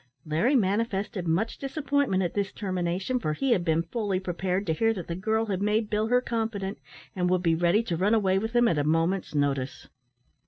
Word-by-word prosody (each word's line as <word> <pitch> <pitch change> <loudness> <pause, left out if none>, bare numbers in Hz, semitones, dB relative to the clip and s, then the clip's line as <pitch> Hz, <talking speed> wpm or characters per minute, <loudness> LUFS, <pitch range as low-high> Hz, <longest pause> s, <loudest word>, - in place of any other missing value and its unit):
Larry 165 - +2
manifested 200 -3 0
much 185 +8 0
disappointment 275 -7 0
at 175 - -2
this 200 -1 -1
termination, 185 +4 -2
for 155 -9 -1
he 270 - 0
had 185 -7 +3
been 165 -1 +1
fully 200 0 -2
prepared 185 +1 -2
to 160 - +1
hear 225 +6 +1
that 180 -4 -5
the 170 - -4
girl 220 +4 0
had 195 -3 -2
made 210 +1 +1
Bill 215 +1 +1
her 250 +2 +3
confidant, 220 -5 -3 0.4
and 180 -1 0
would 180 0 +1
be 165 -2 +3
ready 175 +6 +2
to 185 -7 -2
run 205 +6 +3
away 195 -3 +2
with 225 +3 -4
him 240 0 +5
at 165 -7 +1
a - - +1
moment's 165 +3 0
notice. 140 -2 -1
195 Hz, 205 wpm, -27 LUFS, 175-225 Hz, 0.4 s, him